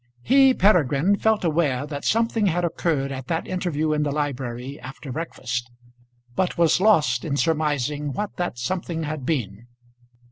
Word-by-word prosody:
He, 270 0 +5
Peregrine, 175 -2 +3
felt 220 -1 +1
aware 150 -5 +1
that 145 -1 -6
something 225 -1 +2
had 175 0 +1
occurred 155 -5 -1
at 130 -1 -6
that 165 -1 -1
interview 160 -4 -1
in 150 - 0
the 145 -1 0
library 135 -2 -3
after 135 +2 -9
breakfast, 125 -5 -4 0.7
but 185 +4 0
was 170 +1 +3
lost 150 - +3
in 145 -3 -2
surmising 150 -2 0
what 205 +10 -4
that 175 -9 -2
something 165 +5 -3
had 150 -3 -4
been. 120 - -2
150 Hz, 150 wpm, -23 LUFS, 135-175 Hz, 0.7 s, He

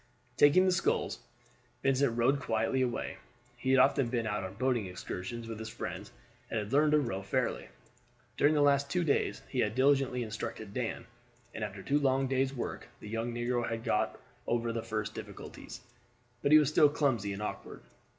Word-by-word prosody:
Taking 145 +8 +6
the 185 - +4
sculls, 180 - 0 0.6
Vincent 135 -3 +2
rowed 130 +4 +3
quietly 115 +1 0
away. 125 -2 -2 0.4
He 120 +2 -4
had 135 - +5
often 135 0 +4
been 115 -2 -1
out 105 -2 -2
on 95 +1 -6
boating 120 -3 0
excursions 95 +5 -6
with 115 -1 -6
his 110 0 -5
friends, - - -6 0.4
and - - -2
had 105 +3 -3
learned 150 +1 +4
to 150 - +6
row 105 -9 -2
fairly. 95 - -1 0.7
During 150 +2 +3
the 145 - +4
last 140 0 +3
two 175 +5 +1
days 145 -4 0
he 130 - -3
had 110 -2 +1
diligently 135 -2 +3
instructed 110 -1 -6
Dan, 125 -1 -3 0.5
and 110 - -5
after 100 -2 -5
two 145 +1 +2
long 135 -1 +2
days' 135 0 +1
work 130 -3 -5
the 105 - -9
young 115 +2 -2
negro 120 0 -1
had 115 0 -4
got - - 0 0.3
over 115 0 0
the 115 - -2
first 110 -1 -3
difficulties, - - -9 0.6
but 140 - +1
he 155 - +10
was 150 -3 +4
still 150 -1 +5
clumsy 130 -9 0
and 100 +2 -4
awkward. - - -6
125 Hz, 185 wpm, -31 LUFS, 110-140 Hz, 0.7 s, he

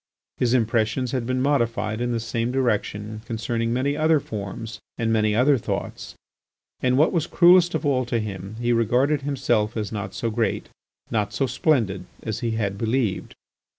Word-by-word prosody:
His 125 0 +2
impressions 115 +1 +1
had 125 -3 -2
been 130 0 0
modified 115 -5 0
in 120 0 0
the 115 - 0
same 115 +1 -2
direction 110 -4 -1
concerning 115 0 -2
many 135 +4 0
other 155 0 +3
forms 110 0 -6 0.2
and 115 -1 0
many 110 -1 +2
other 130 +3 +4
thoughts. - - -5 0.6
And 125 0 +2
what 155 +3 +4
was 170 -2 0
cruelest 175 0 +5
of - - -2
all 130 -3 +2
to 120 0 -1
him, 100 -2 -5
he 120 0 +1
regarded 125 +6 +2
himself 120 -6 0
as 105 -2 -3
not 100 -3 -5
so 115 +2 -2
great, 115 0 -1 0.4
not 105 -2 0
so 135 - +1
splendid, 120 - +1 0.2
as 110 -2 -3
he 120 - -1
had 100 -2 -2
believed. 115 -2 -1
115 Hz, 170 wpm, -24 LUFS, 110-130 Hz, 0.6 s, cruelest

